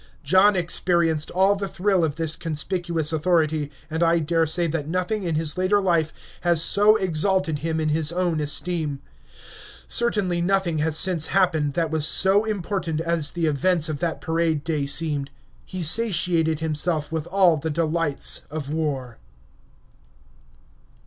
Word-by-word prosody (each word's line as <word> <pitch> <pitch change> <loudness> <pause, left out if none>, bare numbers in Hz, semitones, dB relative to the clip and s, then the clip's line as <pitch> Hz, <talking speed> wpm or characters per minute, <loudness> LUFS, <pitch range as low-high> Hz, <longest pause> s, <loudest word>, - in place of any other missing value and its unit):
John 190 +7 +4
experienced 170 -3 0
all 190 +3 +2
the 200 0 -4
thrill 190 -1 0
of 150 -3 -1
this 160 -1 -1
conspicuous 165 0 -1
authority, 155 -2 0 0.2
and 160 +1 -4
I 170 0 +3
daresay 165 +1 0
that 155 -2 -3
nothing 185 +5 -2
in 170 -4 -2
his 155 +2 0
later 190 +3 +2
life 170 -5 +1 0.3
has 170 -2 +2
so 205 +6 +4
exalted 185 -3 0
him 160 +1 -2
in 155 -1 -1
his 155 0 +1
own 175 -2 -1
esteem; 150 -1 -2 0.9
certainly 205 -7 0
nothing 175 -3 0
has 155 +1 0
since 175 -4 +2
happened 160 -7 +1
that 165 -2 -1
was 160 -1 +2
so 195 +3 +3
important 185 -6 -3
as 165 -3 -1
the 170 -2 -1
events 160 +2 +1
of 150 -2 -4
that 170 -2 -3
parade 160 -2 -1
day 150 -4 -2
seemed. 145 -1 -1 0.4
He 185 -1 -5
satiated 165 -4 +2
himself 155 0 -2
with 160 -1 -3
all 185 -4 +3
the 160 +2 -4
delights 160 -1 0
of 150 -1 -6
war. 135 - -3
165 Hz, 150 wpm, -23 LUFS, 155-180 Hz, 0.9 s, John